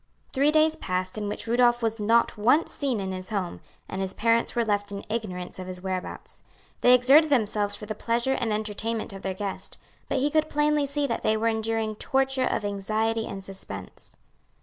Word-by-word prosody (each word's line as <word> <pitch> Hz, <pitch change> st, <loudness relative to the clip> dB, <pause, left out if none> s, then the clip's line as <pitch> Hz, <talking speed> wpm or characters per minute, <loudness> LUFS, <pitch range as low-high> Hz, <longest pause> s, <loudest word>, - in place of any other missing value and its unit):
Three 285 Hz, +2 st, +4 dB
days 310 Hz, 0 st, +4 dB
passed 185 Hz, 0 st, -3 dB
in 210 Hz, -1 st, -3 dB
which -, -, -3 dB
Rudolph 240 Hz, +1 st, +3 dB
was 225 Hz, 0 st, 0 dB
not 230 Hz, +3 st, +3 dB
once 245 Hz, +10 st, +3 dB
seen 265 Hz, -6 st, -1 dB
in 190 Hz, -1 st, -3 dB
his 185 Hz, 0 st, -6 dB
home, 195 Hz, -5 st, -3 dB, 0.3 s
and 190 Hz, -, -4 dB
his 190 Hz, -1 st, -3 dB
parents 230 Hz, +2 st, +2 dB
were 235 Hz, -1 st, +2 dB
left 205 Hz, -1 st, 0 dB
in 200 Hz, 0 st, -6 dB
ignorance 190 Hz, -6 st, -4 dB
of 185 Hz, -, -6 dB
his 180 Hz, 0 st, -7 dB
whereabouts. 185 Hz, -1 st, -5 dB, 0.4 s
They 250 Hz, 0 st, +7 dB
exerted 275 Hz, +6 st, +6 dB
themselves 210 Hz, -6 st, +2 dB
for 210 Hz, -, -7 dB
the 215 Hz, -, -3 dB
pleasure 235 Hz, +4 st, 0 dB
and 235 Hz, -4 st, -1 dB
entertainment 215 Hz, +1 st, -2 dB
of 195 Hz, -, -8 dB
their 190 Hz, -1 st, -3 dB
guest, 200 Hz, 0 st, -4 dB, 0.3 s
but -, -, 0 dB
he 285 Hz, +3 st, +1 dB
could 310 Hz, 0 st, +3 dB
see -, -, -18 dB
plainly 295 Hz, 0 st, +2 dB, 0.2 s
that 230 Hz, -4 st, -2 dB
they 215 Hz, 0 st, +2 dB
were 225 Hz, +1 st, +2 dB
enduring 220 Hz, -1 st, -1 dB
torture 265 Hz, 0 st, +1 dB
of 210 Hz, -, -1 dB
anxiety 220 Hz, +3 st, -1 dB
and 195 Hz, -1 st, -7 dB
suspense. 195 Hz, -1 st, -9 dB
220 Hz, 195 wpm, -26 LUFS, 200-245 Hz, 0.4 s, They